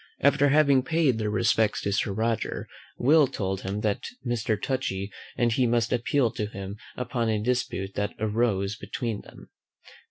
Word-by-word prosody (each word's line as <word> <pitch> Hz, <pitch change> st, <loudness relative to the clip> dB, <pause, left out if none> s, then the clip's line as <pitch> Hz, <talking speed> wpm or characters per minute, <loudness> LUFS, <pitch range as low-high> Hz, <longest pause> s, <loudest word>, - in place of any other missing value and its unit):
After 140 Hz, +1 st, +4 dB
having 140 Hz, -2 st, +5 dB
paid 140 Hz, -4 st, +1 dB
their 105 Hz, -1 st, 0 dB
respects 110 Hz, 0 st, +2 dB
to 100 Hz, -, -1 dB
Sir 100 Hz, +1 st, 0 dB
Roger, 110 Hz, +2 st, -1 dB, 0.3 s
Will 150 Hz, +3 st, +5 dB
told 95 Hz, -6 st, -3 dB
him 100 Hz, +2 st, -3 dB
that 105 Hz, -2 st, -1 dB, 0.2 s
Mr. 115 Hz, -3 st, 0 dB
Touchy 100 Hz, -6 st, -2 dB, 0.3 s
and 120 Hz, -1 st, +2 dB
he 125 Hz, +2 st, +2 dB
must 115 Hz, 0 st, +1 dB
appeal 125 Hz, 0 st, +2 dB
to 110 Hz, -3 st, -3 dB
him 100 Hz, 0 st, -7 dB, 0.2 s
upon 120 Hz, -2 st, -1 dB
a 110 Hz, -, +1 dB
dispute 105 Hz, -4 st, -1 dB
that 105 Hz, -, -2 dB
arose 105 Hz, -2 st, 0 dB
between 115 Hz, -2 st, -4 dB
them. -, -, -15 dB
115 Hz, 160 wpm, -27 LUFS, 105-125 Hz, 0.3 s, having